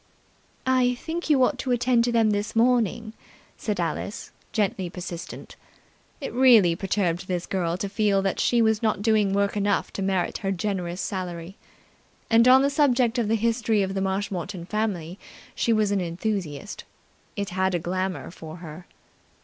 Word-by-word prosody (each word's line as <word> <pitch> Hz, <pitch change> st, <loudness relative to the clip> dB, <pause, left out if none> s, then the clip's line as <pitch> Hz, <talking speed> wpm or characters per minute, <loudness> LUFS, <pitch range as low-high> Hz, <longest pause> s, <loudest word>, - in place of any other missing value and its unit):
"I 255 Hz, -1 st, +3 dB
think 325 Hz, +6 st, -5 dB
you 275 Hz, -4 st, +5 dB
ought 260 Hz, 0 st, +1 dB
to 260 Hz, -, -3 dB
attend 240 Hz, -1 st, +2 dB
to 245 Hz, -, 0 dB
them 225 Hz, -2 st, +3 dB
this 205 Hz, +1 st, -2 dB
morning," 230 Hz, -2 st, +2 dB, 0.4 s
said 210 Hz, -4 st, -3 dB
Alice, 175 Hz, +4 st, -3 dB, 0.2 s
gently 195 Hz, -4 st, -1 dB
persistent. 175 Hz, -1 st, -8 dB, 0.6 s
It 275 Hz, -, -5 dB
really 230 Hz, -9 st, +6 dB
perturbed 185 Hz, -1 st, -1 dB
this 180 Hz, -2 st, -2 dB
girl 175 Hz, -3 st, -1 dB
to 200 Hz, -, -3 dB
feel 200 Hz, -1 st, +1 dB
that 195 Hz, -, -1 dB
she 235 Hz, -1 st, +3 dB
was 220 Hz, -1 st, +2 dB
not 215 Hz, -3 st, 0 dB
doing 215 Hz, -3 st, +3 dB
work 200 Hz, +1 st, +1 dB
enough 205 Hz, -1 st, 0 dB
to -, -, -4 dB
merit 190 Hz, -2 st, -1 dB
her 195 Hz, -, -2 dB
generous 185 Hz, -2 st, -2 dB
salary. 180 Hz, -1 st, -5 dB, 0.8 s
And 230 Hz, +2 st, +6 dB
on 260 Hz, +1 st, +7 dB
the 280 Hz, -, +2 dB
subject 255 Hz, -4 st, +2 dB
of 230 Hz, -, 0 dB
the 225 Hz, -, +2 dB
history 225 Hz, -2 st, +1 dB
of 190 Hz, 0 st, -3 dB
the 195 Hz, -, -2 dB
Marshmoreton 190 Hz, -2 st, -3 dB
family 190 Hz, -4 st, -3 dB, 0.3 s
she 235 Hz, -, 0 dB
was 215 Hz, -2 st, +2 dB
an 200 Hz, -2 st, +1 dB
enthusiast. 180 Hz, 0 st, -4 dB, 0.5 s
It 200 Hz, -2 st, -3 dB
had 190 Hz, 0 st, 0 dB
a -, -, 0 dB
glamour 185 Hz, +2 st, -3 dB
for 160 Hz, -2 st, -10 dB
her. 170 Hz, 0 st, -10 dB
200 Hz, 165 wpm, -25 LUFS, 185-230 Hz, 0.8 s, on